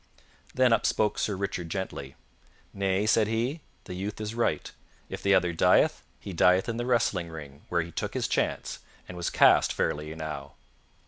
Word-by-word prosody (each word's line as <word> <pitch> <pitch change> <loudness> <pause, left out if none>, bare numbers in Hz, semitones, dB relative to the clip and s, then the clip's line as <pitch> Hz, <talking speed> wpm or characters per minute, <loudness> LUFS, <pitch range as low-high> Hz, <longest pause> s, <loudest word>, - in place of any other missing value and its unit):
Then 125 -2 +4
up 115 - +2
spoke 105 -1 +1
Sir 105 - 0
Richard 95 -3 -3
gently. 80 -8 -5 0.6
"Nay," 100 +1 0
said 110 -1 +3
he, 120 +8 -1 0.2
"the - - -8
youth 100 +4 -5
is 105 0 -4
right; 115 -10 -1 0.4
if - - -6
the 100 0 +4
other 90 -2 +2
dieth, 80 - +3 0.2
he 100 - -7
dieth 90 +3 +4
in 115 - -2
the 120 +1 -3
wrestling 115 -8 +1
ring, 75 -3 -10
where 85 -1 +1
he 85 - -10
took - - -4
his - - 0
chance, - - -1 0.3
and 90 - -8
was 85 -1 -2
cast - - +5
fairly 75 +1 -2
enow." 75 -3 -6
95 Hz, 180 wpm, -28 LUFS, 80-110 Hz, 0.6 s, cast